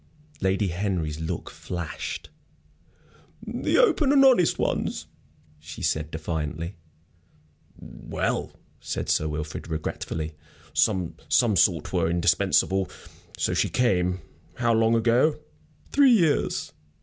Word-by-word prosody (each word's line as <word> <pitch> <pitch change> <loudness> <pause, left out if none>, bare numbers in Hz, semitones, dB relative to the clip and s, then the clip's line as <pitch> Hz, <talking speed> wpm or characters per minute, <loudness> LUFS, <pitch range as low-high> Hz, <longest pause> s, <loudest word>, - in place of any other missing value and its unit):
Lady 95 +1 +1
Henry's 85 -4 -2
look 80 +1 -4
flashed. 85 -5 -6 1.1
"The 240 +2 0
open 330 - +4
and 275 -1 +6
honest 240 -11 +5
ones," - - -1 0.5
she 80 +2 -9
said, 80 -1 0
defiantly. 80 +2 -4 1.0
"Well," - - -3 0.3
said - - -4
Sir 75 - +2
Wilfrid, 75 +1 -5
regretfully, 80 0 -4 0.4
"some 95 -6 +1 0.2
sort 95 - +3
were 85 -3 +2
indispensable. 90 +2 +2 0.5
So - - 0
she - - +1
came. 90 -7 +1 0.3
How 120 -1 +1
long 115 +1 +3
ago?" 120 +7 +3 0.5
"Three 275 -3 +6
years. 165 -9 +1
90 Hz, 100 wpm, -25 LUFS, 80-120 Hz, 1.1 s, and